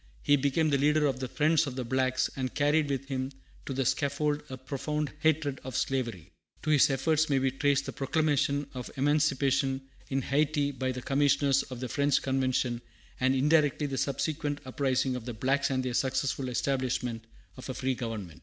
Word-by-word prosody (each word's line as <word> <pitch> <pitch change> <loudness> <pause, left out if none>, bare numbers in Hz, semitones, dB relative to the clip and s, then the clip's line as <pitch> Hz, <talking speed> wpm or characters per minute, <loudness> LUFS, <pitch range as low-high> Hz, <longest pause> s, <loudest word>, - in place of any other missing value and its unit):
He 145 - +5
became 145 +3 +1
the 140 - +2
leader 150 +2 +3
of 135 -3 0
the 130 - -3
"Friends 155 +3 +2
of 130 - -5
the 130 - -2
Blacks," 130 +1 +1
and 130 -1 -3
carried 145 +1 +2
with 135 -1 -2
him 130 -1 -3 0.4
to 135 - -2
the 135 0 -1
scaffold 145 +3 0
a 130 - -6
profound 145 +3 -3
hatred, 155 -3 +1
of 130 -1 -4
slavery. 115 -10 -2 0.3
To 155 - 0
his 145 -2 +5
efforts 155 +3 +1
may 140 - +3
be 135 0 +1
traced 140 +1 +1
the - - -5
proclamation 145 0 +1
of 125 -2 -6
emancipation 140 -2 +2 0.3
in 135 -1 0
Hayti 145 +1 +1
by 130 -1 -2
the 125 -1 -6
commissioners 140 0 +3
of 125 -2 -8
the 130 - -2
French 140 +2 +2
convention, 130 -2 0 0.4
and 130 +1 +2
indirectly 150 +1 +3
the 135 -2 -2
subsequent 145 +2 -1
uprising 130 -1 0
of 125 -2 -6
the 120 -2 -5
blacks 135 +5 +1
and 130 -1 -1
their 125 - -2
successful 130 +1 0
establishment 125 -3 -1 0.3
of 130 - -9
a 130 - -3
free 130 0 0
government. 110 -9 -6
135 Hz, 185 wpm, -29 LUFS, 130-145 Hz, 0.4 s, He